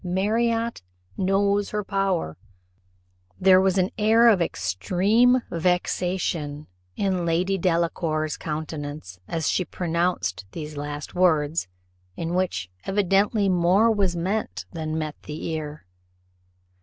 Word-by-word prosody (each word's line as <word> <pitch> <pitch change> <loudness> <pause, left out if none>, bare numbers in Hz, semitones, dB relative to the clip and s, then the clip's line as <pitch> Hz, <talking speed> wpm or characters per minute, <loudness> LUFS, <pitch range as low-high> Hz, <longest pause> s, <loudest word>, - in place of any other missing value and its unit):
Marriott 225 - 0 0.3
knows 200 - +1
her 210 0 -2
power." 195 - -1 1.0
There 185 0 +6
was 190 0 +2
an 185 0 +2
air 225 +3 +6
of 200 -6 +4
extreme 205 - +2
vexation 170 -3 -1 0.3
in 190 -3 0
Lady 175 +3 +1
Delacour's 165 -3 0
countenance 150 - -6
as 165 -2 -2
she 185 - +1
pronounced 170 - -1
these 150 -2 -6
last 145 0 -6
words, 160 - +2 0.5
in 165 +1 -3
which 175 - -1
evidently 200 +2 +2
more 185 +5 +4
was 195 -5 +1
meant 190 +6 -2
than 160 -1 -3
met 155 -1 -3
the 150 +1 -6
ear. 155 -4 -5
180 Hz, 110 wpm, -24 LUFS, 155-195 Hz, 1.0 s, There